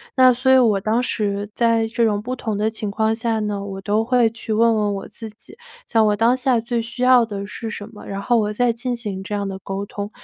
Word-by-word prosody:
那 255 -1 +6
所 250 +2 0
以 260 - +7
我 225 -6 +3
当 220 +5 0
时 205 -3 -2
在 230 -1 +2
这 230 +1 +1
种 205 -2 0
不 250 +4 -5
同 220 -3 -3
的 215 +2 0
情 215 -1 -4
况 220 +2 0
下 225 0 -1
呢， 210 -2 -2
我 195 -1 -6
都 210 +3 0
会 245 -1 +3
去 220 0 -5
问 230 +1 +4
问 210 -1 0
我 195 - -6
自 225 - -9
己， 215 - -17 0.3
像 225 -2 +3
我 210 - +2
当 230 +4 +3
下 250 -3 +1
最 235 0 -2
需 235 +2 -5
要 250 -2 +6
的 200 -2 -5
是 225 +2 -6
什 210 -1 -6
么， 210 - -12
然 200 0 -5
后 240 +3 +2
我 210 -1 -1
再 245 +2 +2
进 240 +2 -3
行 205 -5 -5
这 205 +2 -4
样 200 - -2
的 190 - -6
沟 195 +1 -5
通。 205 0 -6
220 Hz, 275 characters per minute, -21 LUFS, 205-235 Hz, 0.3 s, 以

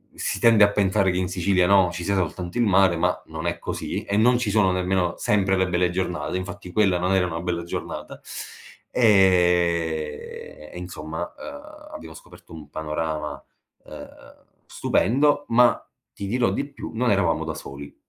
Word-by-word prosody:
si - - -3
tende 115 -3 +7
a 100 - 0
pensare 100 -1 +2
che 90 - -2
in 90 -1 -1
Sicilia, 95 0 +1
no, 95 -1 +5
ci 85 0 -5
sia 100 +3 0
soltanto 90 +1 -3
il 120 - +3
mare, 95 -3 +4
ma 90 +2 0
non 80 +1 -7
è 85 0 -1
così, - - -4
e 100 - -1
non 120 +3 +4
ci 120 -3 -1
sono 100 -3 +3
nemmeno 90 -1 0
sempre 95 -2 +1
le 95 -1 +1
belle 90 0 +1
giornate, 90 -5 -3
infatti 95 0 -6
quella 100 -3 +3
non 90 +2 0
era 95 -1 +3
una 85 -2 -4
bella 85 -1 -2
giornata 85 - -6 0.7
e 85 -8 +1
e - - -9
insomma, 80 -2 -6 0.2
uhm, 300 +1 -11
abbiamo 80 - -9
scoperto 80 - -15
un 75 -3 -11
panorama, 75 0 -4 0.4
uhm, - - -13 0.2
stupendo, 145 +4 +1
ma 120 +1 +4 0.3
ti 100 - -6
dirò 120 +4 +1
di 140 - -2
più, 140 - -8
non 120 +2 0
eravamo 95 -5 +1
da - - -3
soli. 70 +1 -9
90 Hz, 175 wpm, -24 LUFS, 85-100 Hz, 0.7 s, tende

